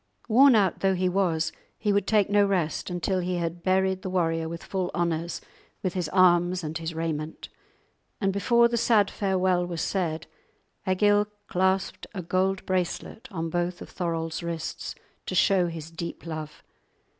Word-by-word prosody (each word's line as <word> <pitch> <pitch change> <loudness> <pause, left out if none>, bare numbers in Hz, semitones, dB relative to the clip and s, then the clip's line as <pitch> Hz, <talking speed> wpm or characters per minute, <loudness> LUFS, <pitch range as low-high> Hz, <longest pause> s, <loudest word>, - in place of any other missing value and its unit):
Worn 260 +3 +7
out 195 -5 +2
though 190 -1 +2
he 185 0 +1
was, 175 -4 +1 0.3
he 210 -2 +1
would 200 -1 +1
take 210 -3 +3
no 205 0 +4
rest 185 -6 0
until 180 +1 -1
he 180 0 -1
had 170 0 -3
buried 190 +1 +1
the 185 - -4
warrior 165 -3 0
with 170 0 -7
full 185 -2 -2
honours, 170 0 -1 0.4
with 185 -2 -1
his 180 -5 -2
arms 180 0 +4
and 155 0 -4
his 165 0 -5
raiment; 160 -1 -4 0.7
and 195 -2 +1
before 235 +4 +4
the 235 0 -1
sad 215 -3 +3
farewell 185 -3 +1
was 175 -2 -3
said 165 -5 -1 0.6
Egil 205 +2 +3 0.2
clasped 190 0 0
a 185 - -4
gold 190 +3 0
bracelet 185 +4 -2
on 165 -5 -4
both 175 +1 -1
of - - -9
Thorolf's 165 -2 -2
wrists 170 -1 -4 0.3
to - - -3
show 190 -3 +4
his 165 -1 -7
deep 170 +1 -6
love. 155 -2 -6
180 Hz, 165 wpm, -26 LUFS, 165-195 Hz, 0.7 s, Worn